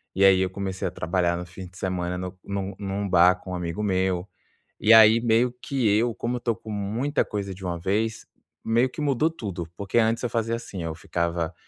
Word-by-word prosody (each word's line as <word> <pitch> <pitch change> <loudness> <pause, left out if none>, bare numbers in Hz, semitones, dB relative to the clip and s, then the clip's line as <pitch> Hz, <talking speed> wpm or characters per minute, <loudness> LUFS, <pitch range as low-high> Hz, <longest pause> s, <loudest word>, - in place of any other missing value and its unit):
e 95 - +2
aí 95 -1 +6
eu 95 - +1
comecei 95 0 -3
a - - -4
trabalhar 85 +1 0
no 90 - -5
fim 90 +1 -10
de 90 +1 -17
semana 90 -1 -2
no 90 +1 -6
num 100 0 -4
num 100 0 -3
bar 90 0 +6
com 90 0 -10
um - - -2
amigo 90 +3 -3
meu. 95 -2 0 0.5
E 110 - +5
aí, 110 0 +8
meio 120 +1 +3
que 130 -5 0
eu 115 +1 +1
como 120 +3 -2
eu - - -5
tô 120 -1 0
com 110 - -10
muita 110 +8 -1
coisa 100 -2 -4
de 95 +1 -11
uma 85 -1 -2
vez, 105 +6 -1 0.4
meio 115 +3 +3
que 155 - -8
mudou 150 +1 +2
tudo, 95 - -6
porque 100 +3 -1
antes 115 0 +2
eu 120 - 0
fazia 115 0 -1
assim, 100 -6 -7
eu 80 -1 -3
ficava 85 +1 -2
100 Hz, 220 wpm, -25 LUFS, 90-115 Hz, 0.5 s, aí